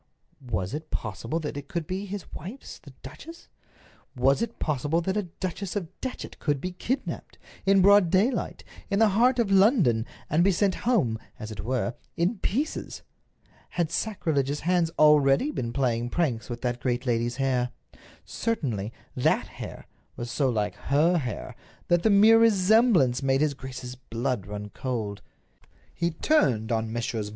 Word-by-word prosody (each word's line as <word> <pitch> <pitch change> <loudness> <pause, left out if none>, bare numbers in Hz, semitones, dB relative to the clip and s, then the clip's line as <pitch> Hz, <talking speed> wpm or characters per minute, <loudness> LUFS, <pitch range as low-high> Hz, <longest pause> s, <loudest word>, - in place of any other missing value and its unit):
Was 95 -3 -2
it 155 +1 -5
possible 115 - -3
that 150 - -4
it 140 -1 -7
could 170 -2 -3
be 190 +4 -4
his 200 -1 -5
wife's, 200 - -8
the 145 - -14
duchess? 220 - -11 0.7
Was 135 - +3
it 230 0 -3
possible 150 +2 0
that 190 +3 -2
a 210 - +2 0.2
Duchess 185 +1 -4
of 185 -6 -3
Datchet 260 - -6
could 145 -3 0
be 180 +6 -4
kidnaped, 240 +9 -4 0.3
in 195 -1 +5
broad 200 -2 +6
daylight, 205 +9 +1 0.3
in 200 - +1
the 220 0 +5
heart 240 +6 +3
of 230 -5 +1
London, 190 - +4 0.2
and 160 +4 +2
be 195 - +4
sent 195 +1 +2 0.2
home, 125 - +2 0.2
as 110 0 -7
it 100 -2 -6
were, 125 0 -1 0.2
in 185 +6 0
pieces? 280 +14 -2 0.7
Had 170 -3 -1
sacrilegious 150 -8 -1
hands 175 -1 +2
already 150 - +5
been 120 - -3
playing 120 -2 0
pranks 130 -7 -1
with 120 -1 -5
that 120 -1 -1
great 125 +1 -1
lady's 120 -1 0
hair? 130 -2 0 0.6
Certainly, 120 - -2 0.2
that - - +2
hair - - -9 0.3
was 120 0 -5
so 135 -3 +1
like 105 -3 -1 0.2
her 165 +5 +4
hair 125 -7 -5 0.3
that 175 -1 +4
the 220 - +3
mere 215 +3 +7
resemblance 205 - +4
made 135 0 +2
his 150 -2 +2
grace's 130 -2 -7
blood 125 -3 -3
run 105 0 -6
cold. 110 -6 -4 0.7
He 170 - 0
turned 135 - +1
on 110 -1 0
Messrs. 115 -2 -2
150 Hz, 160 wpm, -26 LUFS, 120-195 Hz, 0.7 s, mere